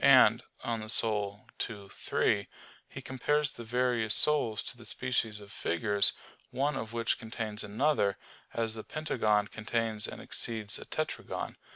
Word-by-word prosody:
And - - +7 0.2
(De - - -9
Anima 110 -2 -2 0.8
ii, 100 -3 -9
3) 100 +1 0 0.4
he 135 - -8
compares 145 +3 0
the 120 - -9
various 120 -2 +3
souls 120 -9 +4
to - - -6
the 120 - -14
species 115 -4 0
of 100 -1 -13
figures, 100 +3 +2 0.4
one 140 +3 0
of 115 -4 -4
which 115 -1 0
contains 110 -1 -3
another; 105 -1 +1 0.3
as 115 -1 -1
a 110 - -6
pentagon 105 -9 0
contains 110 0 -2
and - - -8
exceeds 110 -3 -1
a - - -9
tetragon. - - -4
115 Hz, 145 wpm, -30 LUFS, 105-125 Hz, 0.8 s, And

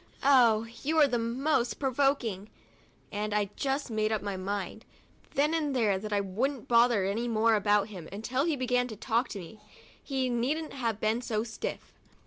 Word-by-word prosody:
Oh, 235 -5 +5 0.2
you 315 +3 0
are 305 - +7
the 240 -3 0
most 240 +2 0
provoking 260 -7 0 0.2
— - - -31
" - - -35
and 210 0 -2
I 205 -1 0
just 275 -2 -2
made 215 0 0
up 215 -2 -1
my 200 -1 -3
mind, 195 +3 -4 0.5
then 295 +3 +2
and 300 -4 0
there, 210 -6 +2
that 210 +2 -6
I 205 - +2
wouldn't 235 +7 -2
bother 235 -4 +4
any 220 +5 -1
more 225 0 +3
about 205 0 +2
him 180 -6 -9
until 245 +7 -1
he 325 -3 +1
began 250 -1 +1
to 220 - -7
talk 230 +4 0
to 200 - -6
me. 210 +4 -11 0.4
He 265 -2 -1
needn't 265 +6 -1
have 230 -6 -2
been 220 +2 +1
so 220 -3 -1
stiff. 225 -1 -6
230 Hz, 190 wpm, -29 LUFS, 210-265 Hz, 0.5 s, are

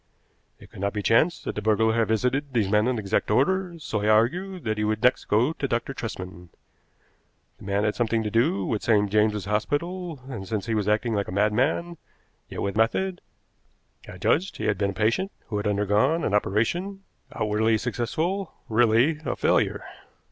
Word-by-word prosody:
It - - -16
could - - -12
not 100 0 -1
be 105 -1 -3
chance 155 - +2
that - - -3
the 105 - -4
burglar 110 +1 +2
had 115 -1 +1
visited 130 +5 0
these 110 -5 +2
men 105 +3 +2
in 125 -1 0
exact 105 -1 -1
order, 175 - +1
so 115 -9 -3
I 105 - -1
argued 170 - +1
that 110 -1 -2
he - - 0
would 110 0 -1
next 125 - +3
go 120 +9 +2
to 140 - -3
Dr. 120 +2 -2
Tresman. 90 -7 -7 1.1
The - - -12
man 100 +1 0
had 105 - +2
had - - -5
something 115 -1 +1
to 105 - -3
do 140 - +1
with 110 - -1
St. 105 -3 +2
James's 105 -2 +2
Hospital, 160 - -2
and, 110 -8 -7
since 105 0 -3
he 115 - -2
was 105 -2 0
acting 110 +2 +1
like 100 -1 -1
a - - -6
madman, 120 - 0 0.5
yet - - -5
with 100 0 -2
method, 180 - 0 0.9
I 90 - -9
judged 170 - 0
he - - -4
had 105 -3 0
been 100 -1 +1
a - - -4
patient 115 - 0 0.2
who 105 - -2
had 105 +1 -2
undergone 105 - +1
an 105 - -1
operation, 175 - 0 0.3
outwardly 110 +1 +1
successful, 140 - -2
really 120 +7 +3
a - - -2
failure. - - +1
110 Hz, 190 wpm, -25 LUFS, 105-140 Hz, 1.1 s, next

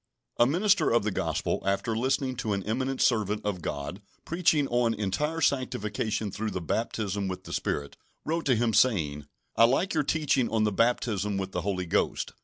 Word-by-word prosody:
A 120 - +5
MINISTER 195 +8 +3
of 120 -1 +3
the 105 - -1
Gospel, - - -1
after 100 +4 0
listening 130 +2 0
to 110 -4 -1
an 100 -1 -2
eminent 130 +5 -2
servant 105 -3 +1
of 100 -4 -2
God 75 +6 -5 0.2
preaching 165 -4 +2
on 120 -1 +2
entire 110 - -1
sanctification 110 -6 -1
through 110 +3 -3
the 95 - -3
baptism 100 +2 -2
with 95 -1 -5
the - - -8
Spirit, 70 0 -3 0.3
wrote 165 0 -1
to 130 - +4
him, 115 0 +1
saying: 75 - +2 0.3
"I 115 - +7
like 135 +11 +1
your 155 - +2
teaching 145 -4 +1
on 110 -1 +1
the 105 - +2
baptism 105 -2 +1
with 95 0 -3
the - - -2
Holy 95 -2 -2
Ghost. 85 - 0
110 Hz, 185 wpm, -28 LUFS, 100-130 Hz, 0.3 s, I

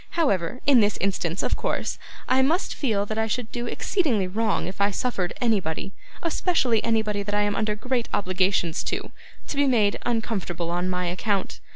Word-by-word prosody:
However, 205 - +1
in 275 -3 +6
this 210 -1 +2
instance, 185 -2 -1
of - - +1
course, - - -2 0.3
I 260 +1 +4
must 320 +8 +1
feel 215 -8 0
that 215 +1 -3
I 220 - +1
should 225 0 -3
do 240 0 -3
exceedingly 250 - +1
wrong 215 +3 0
if 190 +2 -5
I 200 - +4
suffered 195 -4 -1
anybody 195 -7 0 0.3
especially 320 - +2
anybody 220 -3 +1
that 205 +1 -2
I 205 - +3
am 205 0 0
under 215 -1 0
great 245 +2 -2
obligations 185 -3 +1
to - - -3 0.4
to - - -4
be 285 0 +3
made 215 -6 +3
uncomfortable 200 -8 -2
on 175 +1 0
my 180 0 -1
account. 190 +3 -1
210 Hz, 180 wpm, -25 LUFS, 190-245 Hz, 0.4 s, in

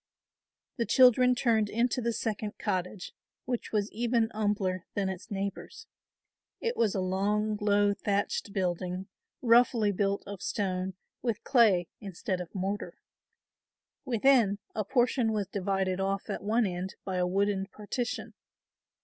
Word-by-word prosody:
The 235 - -1
children 250 0 +6
turned 225 -4 +2
into 240 +3 +1
the 235 0 0
second 215 -2 -3
cottage 185 -2 -3 0.3
which 245 -2 -3
was 210 -1 0
even 230 0 +1
humbler 205 -4 -1
than 195 -2 0
its 190 +4 -7
neighbours. 200 - -5 0.7
It 470 +1 -1
was 215 -3 +1
a - - +1
long, 205 +3 0
low, 205 0 +3
thatched 200 0 -1
building, 185 0 -2 0.3
roughly 230 -3 +5
built 200 +1 0
of 200 -2 -7
stone 185 -2 -2 0.3
with 230 -3 -2
clay 205 -9 +4
instead 190 -2 -4
of 175 +1 -9
mortar. 195 +2 -3 1.1
Within, 240 -4 +3 0.2
a 215 - -1
portion 245 0 +2
was 210 -2 0
divided 190 -1 -1
off 195 0 -1
at - - -3
one 220 +4 +2
end 185 0 -4
by 190 -1 -2
a 180 0 +1
wooden 195 +1 0
partition. 215 +4 -4
205 Hz, 135 wpm, -29 LUFS, 190-230 Hz, 1.1 s, children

